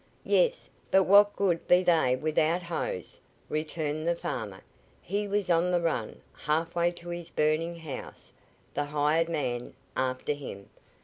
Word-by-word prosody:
"Yes. - - +2 0.2
But 190 0 +5
what 205 +2 +6
good 180 -4 0
be 180 +1 +5
they 160 -8 +3
without 155 +4 +1
hose?" 485 - -4 0.3
returned 155 0 -2
the 170 - +2
farmer. 105 - -5 0.4
He 205 +3 -2
was 200 -1 0
on 170 +1 +3
the 180 -1 +2
run, 160 -10 -2
halfway 165 +3 0
to 175 0 -11
his 175 -1 -5
burning 155 +3 +1
house, 160 -6 -8 0.4
the 145 - -1
hired 150 +3 +1
man 125 -7 -3 0.2
after 130 +2 -1
him. 130 -9 -9
165 Hz, 140 wpm, -29 LUFS, 150-175 Hz, 0.4 s, what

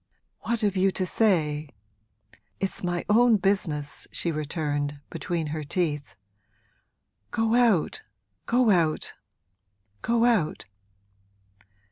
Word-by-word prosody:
'What 235 +1 -2
have 205 -2 +1
you 190 +1 +3
to 185 - -1
say? 155 -8 +1 0.9
It's 195 -1 -3
my 175 -1 -1
own 230 +1 +5
business!' 175 -7 -1
she 170 - -1
returned, 145 -2 -2
between 170 -3 -2
her 155 -1 -3
teeth. 145 - -2 1.1
'Go 225 0 0
out, 240 - +3 0.5
go 240 -2 +4
out, 165 -5 +1 0.9
go 235 0 +2
out!' 215 -11 +1
180 Hz, 100 wpm, -26 LUFS, 150-220 Hz, 1.1 s, own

